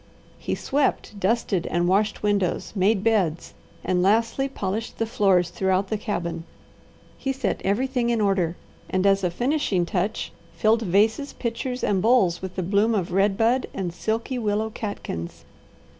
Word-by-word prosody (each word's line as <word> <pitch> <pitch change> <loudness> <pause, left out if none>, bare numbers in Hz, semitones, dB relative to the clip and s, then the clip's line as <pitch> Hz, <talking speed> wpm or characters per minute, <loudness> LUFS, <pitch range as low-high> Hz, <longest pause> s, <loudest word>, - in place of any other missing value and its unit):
He - - -2
swept, 270 -6 -1
dusted, 195 -3 0
and 175 0 0
washed 205 +4 +1
windows, 200 -3 0
made 200 +1 +2
beds, 195 -8 +1 0.3
and 180 -1 +1
lastly 230 +7 +2
polished 215 -2 -4
the 225 - 0
floors 190 -5 +2
throughout 190 +1 0
the - - 0
cabin. 170 -6 -3 0.8
He 270 - -1
set 265 -6 -2
everything 245 +4 0
in 235 -1 +1
order, 190 -5 +1 0.3
and 185 +1 0
as 195 0 +3
a 180 - +2
finishing 240 - 0
touch, 190 +5 -2 0.2
filled 220 +1 +2
vases, 220 +8 +1
pitchers, 250 +2 -4
and 195 -3 +1
bowls 200 -6 +3
with 190 -1 -6
the 185 - -2
bloom 205 +5 +2
of 185 -3 -1
red 195 +2 +2
bud 235 +3 +2
and 180 -3 -3
silky 225 +7 -2
willow 215 0 -1
catkins. 145 - -6
205 Hz, 155 wpm, -24 LUFS, 185-230 Hz, 0.8 s, as